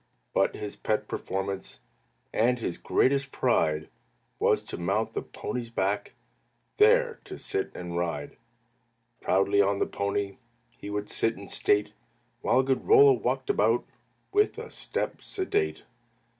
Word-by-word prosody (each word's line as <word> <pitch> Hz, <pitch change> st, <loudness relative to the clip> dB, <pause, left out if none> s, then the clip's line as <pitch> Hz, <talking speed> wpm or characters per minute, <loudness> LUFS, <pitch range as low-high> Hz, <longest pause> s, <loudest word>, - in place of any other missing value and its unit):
But -, -, +2 dB
his 105 Hz, -, -4 dB
pet 110 Hz, -, -1 dB
performance, 95 Hz, -6 st, -4 dB, 0.5 s
And 125 Hz, +3 st, +3 dB
his 100 Hz, -7 st, -4 dB
greatest 140 Hz, +1 st, +2 dB
pride, 80 Hz, -11 st, +1 dB, 0.5 s
Was -, -, +3 dB
to -, -, -6 dB
mount 100 Hz, +6 st, 0 dB
the -, -, -2 dB
pony's 120 Hz, -2 st, -5 dB
back, 100 Hz, -2 st, -1 dB, 0.6 s
There 470 Hz, +2 st, +4 dB
to -, -, -8 dB
sit 400 Hz, -1 st, -2 dB
and 90 Hz, -1 st, -6 dB
ride. 85 Hz, -4 st, -2 dB, 0.8 s
Proudly 100 Hz, +2 st, +3 dB
on 100 Hz, 0 st, +2 dB
the -, -, +1 dB
pony 100 Hz, -1 st, -2 dB, 0.3 s
He 105 Hz, -, -9 dB
would 105 Hz, 0 st, -3 dB
sit 115 Hz, 0 st, 0 dB
in 100 Hz, 0 st, -9 dB
state, 105 Hz, 0 st, +1 dB, 0.5 s
While 130 Hz, -, +3 dB
good 130 Hz, 0 st, 0 dB
Rollo 425 Hz, -1 st, +8 dB
walked 410 Hz, -, 0 dB
about -, -, +2 dB, 0.5 s
With 415 Hz, +2 st, +2 dB
a -, -, -7 dB
step -, -, -3 dB
sedate. 400 Hz, +1 st, -1 dB
105 Hz, 135 wpm, -28 LUFS, 95-140 Hz, 0.8 s, Rollo